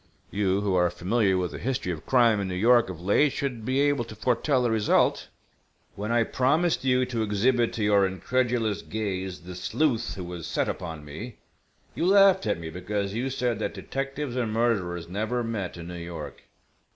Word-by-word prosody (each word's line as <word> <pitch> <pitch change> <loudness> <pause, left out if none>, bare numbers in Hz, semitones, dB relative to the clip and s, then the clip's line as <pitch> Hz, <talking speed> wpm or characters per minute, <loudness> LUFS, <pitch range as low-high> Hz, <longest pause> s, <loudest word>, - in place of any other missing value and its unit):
You 100 -1 +1
who 100 -2 0
are 90 -1 +3
familiar 95 +2 +1
with 90 -2 -1
the - - -7
history 125 -7 -2
of 80 -3 -7
crime 120 -5 +4
in 100 - -2
New 90 - -3
York 120 +3 +4
of 90 -3 -7
late 100 +11 +3
should 125 -5 -3
be 130 +4 +1
able 145 -3 +2
to 110 - -10
foretell 125 +4 +1
the 120 - +1
result. 110 -2 +2 0.7
When 105 +3 -4
I 120 0 +3
promised 145 +7 +1
you 130 -1 +3
to 120 -3 -3
exhibit 115 +3 +2
to 110 - -2
your 100 -2 +4
incredulous 115 +2 0
gaze 95 -4 -4
the 90 +2 -9
sleuth 115 - -1
who 95 - -6
was 85 -2 -6
set - - 0
upon 80 -4 -5
me, 100 +12 -8 0.6
you 170 - 0
laughed 195 - +5
at 105 - 0
me 80 -1 -6
because 100 +3 -3
you 125 +4 -1
said 125 -4 -1
that - - -3
detectives 135 -1 -4
and 120 -4 -1
murderers 95 -7 0
never 110 +7 -2
met 105 -6 -4
in 85 0 -8
New - - -6
York. 85 -3 -8
110 Hz, 190 wpm, -26 LUFS, 95-125 Hz, 0.7 s, laughed